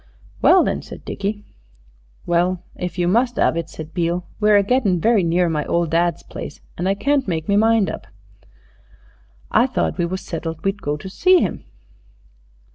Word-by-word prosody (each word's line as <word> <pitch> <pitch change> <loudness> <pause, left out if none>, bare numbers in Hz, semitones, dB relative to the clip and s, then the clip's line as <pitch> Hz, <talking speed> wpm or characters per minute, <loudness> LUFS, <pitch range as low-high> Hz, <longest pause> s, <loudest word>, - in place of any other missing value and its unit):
"Well, 375 - +6
then?" - - -1
said - - -11
Dickie. 205 +1 -3 0.8
"Well, 175 +1 +1
if 180 -1 -5
you 175 -1 +1
must 240 +5 +2
'ave 165 - +2
it," 165 -1 -5
said 155 0 -9
Beale, 175 0 -1
"we're 210 -1 +5
a 200 - +4
gettin' 205 -5 +2
very 225 +3 +3
near 170 +1 +2
my 155 -2 -1
ole 170 0 +1
dad's 170 +2 0
place, 145 - -8 0.2
and 180 +3 -1
I 195 - +2
can't 280 +4 +1
make 160 -3 -2
me 200 - +2
mind 220 -1 +4
up." - - -6 1.4
"I - - +4
thought 80 -2 -1
we 175 - +2
was 185 +2 -4
settled 165 -1 -6
we'd 195 +1 -1
go 145 +1 -2
to 150 - -9
see 365 - +4
'im." - - -6
180 Hz, 180 wpm, -21 LUFS, 170-210 Hz, 1.4 s, Well